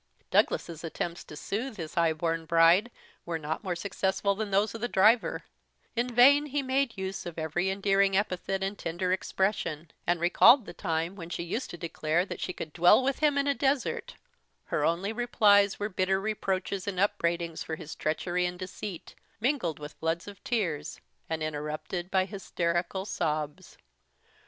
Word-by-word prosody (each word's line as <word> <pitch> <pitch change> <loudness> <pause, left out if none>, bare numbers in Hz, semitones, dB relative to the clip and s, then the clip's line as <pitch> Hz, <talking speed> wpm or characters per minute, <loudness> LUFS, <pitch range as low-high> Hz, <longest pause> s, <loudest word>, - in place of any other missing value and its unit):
Douglas's 165 -1 +1
attempts 170 +1 -4
to 150 - -10
soothe 220 - -4
his 165 -3 -6
high 165 -1 +3
born 165 +1 -2
bride 170 +7 +5 0.3
were 170 -1 -3
not 155 +3 -4
more 185 -3 -2
successful 195 +2 0
than 210 +1 -3
those 200 +1 +2
of 225 - -7
the 240 - 0
driver: 220 +2 +3 0.5
in 240 +2 +1
vain 270 +5 +6
he 285 0 -1
made 260 -3 0
use 190 0 -4
of 170 - -7
every 165 +4 -1
endearing 195 0 +2
epithet 195 -1 -1
and 195 +1 -3
tender 175 +2 -2
expression, 185 -5 -1 0.2
and 175 0 +2
recalled 225 +8 +6
the - - -8
time 165 +2 -2
when 170 -3 -8
she 170 - -3
used 225 +10 -3
to 175 - -7
declare 165 +1 -1
that - - -7
she - - -2
could 160 -3 -7
dwell 175 +8 +6
with 270 +1 0
him 295 -2 +3
in 280 - +2
a 285 - +2
desert; 275 -1 -1 0.5
her 150 - -1
only 175 +7 0
replies 205 -4 +4
were 205 - -1
bitter 190 -1 0
reproaches 195 -2 -2
and 190 -3 -2
upbraidings 170 -5 0
for 160 - -4
his 160 -1 -8
treachery 175 +3 -1
and 180 0 -6
deceit, 185 0 -7 0.3
mingled 230 - 0
with 150 +1 -8
floods 165 +2 -2
of 200 -1 -11
tears, 190 - -2 0.3
and 160 -1 -2
interrupted 155 +4 -4
by 190 -1 +2
hysterical 185 -1 -2
sobs. 155 -6 -3
185 Hz, 170 wpm, -29 LUFS, 165-205 Hz, 0.5 s, vain